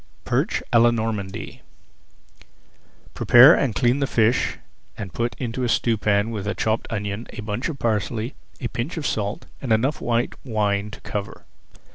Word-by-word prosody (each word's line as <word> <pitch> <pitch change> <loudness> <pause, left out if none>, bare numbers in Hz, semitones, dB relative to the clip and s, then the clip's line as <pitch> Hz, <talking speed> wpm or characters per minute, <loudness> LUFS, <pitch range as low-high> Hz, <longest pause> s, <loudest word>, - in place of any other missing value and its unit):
PERCH - - 0
À 115 - +7
LA 120 - +6
NORMANDY 110 -4 -3 1.5
Prepare 130 +7 +8
and 130 - +1
clean 125 +3 +2
the 140 - +1
fish 115 +1 +2 0.4
and 100 -4 -6
put 120 -2 -2
into 125 +1 -3
a 120 - 0
stewpan 105 -2 +1
with 105 -3 -4
a 105 - -1
chopped 110 +1 -1
onion, 105 0 -4
a - - -6
bunch 105 +7 -3
of 155 - -5
parsley, 115 +1 -1 0.3
a 120 - -2
pinch 125 +9 -4
of 155 - -3
salt, 105 -1 -2 0.2
and 130 - -3
enough 125 +7 +1
white 120 0 0
wine 105 -4 0
to 110 - -11
cover. 100 -1 -5
115 Hz, 160 wpm, -23 LUFS, 105-120 Hz, 1.5 s, Prepare